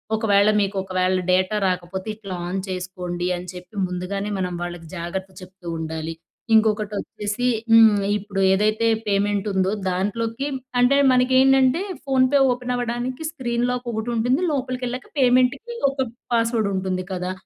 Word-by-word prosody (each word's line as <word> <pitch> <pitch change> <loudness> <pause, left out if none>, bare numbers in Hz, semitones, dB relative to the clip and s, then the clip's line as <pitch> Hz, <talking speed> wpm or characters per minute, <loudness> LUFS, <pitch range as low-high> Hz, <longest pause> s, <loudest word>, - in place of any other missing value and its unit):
ఒకవేళ 205 -2 +3
మీకు, 200 0 0
ఒకవేళ 185 0 0
డేటా 185 +3 +2
రాకపోతే 185 +2 -3
ఇట్లా 195 -4 -7
ఆన్ 190 +2 -2
చేసుకోండి. 180 -1 -4
అని 180 +1 -8
చెప్పి 180 +3 -12
ముందుగానే, 185 +3 -4
మనం 180 -1 -2
వాళ్ళకి 175 -2 -7
జాగ్రత్త 190 +3 -5
చెప్తూ 185 -1 -13
ఉండాలి. 160 0 -4 0.4
ఇంకొకటి 215 -1 +2
వచ్చేసి 210 +4 -3 0.2
హ్మ్. 225 -2 +7 0.2
ఇప్పుడు 200 -1 -4
ఏదైతే 215 +3 +2 0.2
పేమెంట్ 205 0 +1
ఉందో, 190 0 +1 0.2
దాంట్లోకి 225 +8 -2 0.3
అంటే, 270 +3 +4 0.2
మనకి 255 +1 +2
ఏంటంటే, 270 +3 +4 0.2
ఫోన్‌ 260 -2 +3
పే 280 - +6
ఓపెన్ 250 0 -2
అవ్వడానికి 245 +4 -3
స్క్రీన్ 240 -5 -2
లాక్ 250 0 -4
ఒకటి 220 +2 -3
ఉంటుంది. 245 +7 +1
లోపలికకెళ్ళాక 255 -2 -3
పేమెంట్‌కి 255 - +2 0.2
ఒక 265 -2 -2 0.3
పాస్వర్డ్ 230 -2 +1
ఉంటుంది 185 -1 -2
కదా! 180 0 -3
210 Hz, 140 wpm, -22 LUFS, 185-245 Hz, 0.4 s, హ్మ్